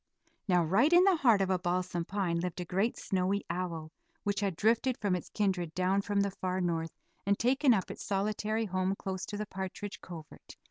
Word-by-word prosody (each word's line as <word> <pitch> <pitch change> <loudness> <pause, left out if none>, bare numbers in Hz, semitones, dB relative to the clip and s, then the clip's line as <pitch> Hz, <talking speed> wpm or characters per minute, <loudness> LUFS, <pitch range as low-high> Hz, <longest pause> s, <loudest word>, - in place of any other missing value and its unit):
Now 180 -3 +4
right 200 - +3
in 350 +1 +7
the 385 -1 +5
heart 230 -9 +4
of 190 0 +1
a 185 - +2
balsam 175 -1 -1
pine 185 -4 -1
lived 180 +1 -3
a 180 - -3
great 195 +7 0
snowy 195 0 0
owl, 170 -3 -4 0.3
which 205 -1 0
had 200 -4 -1
drifted 230 +6 +2
from 200 -3 0
its 180 - -5
kindred 185 -6 -1
down 185 +2 +2
from 200 0 0
the 200 0 0
far 185 -1 -2
North, 165 -2 -2 0.3
and 200 0 +2
taken 265 +3 +3
up 195 -6 +1
its - - -8
solitary 210 +2 -1
home 185 0 0
close 190 -1 -4
to 205 - -5
the 210 - -3
partridge 190 +1 -6
covert. 165 -4 -11
190 Hz, 200 wpm, -31 LUFS, 180-210 Hz, 0.3 s, in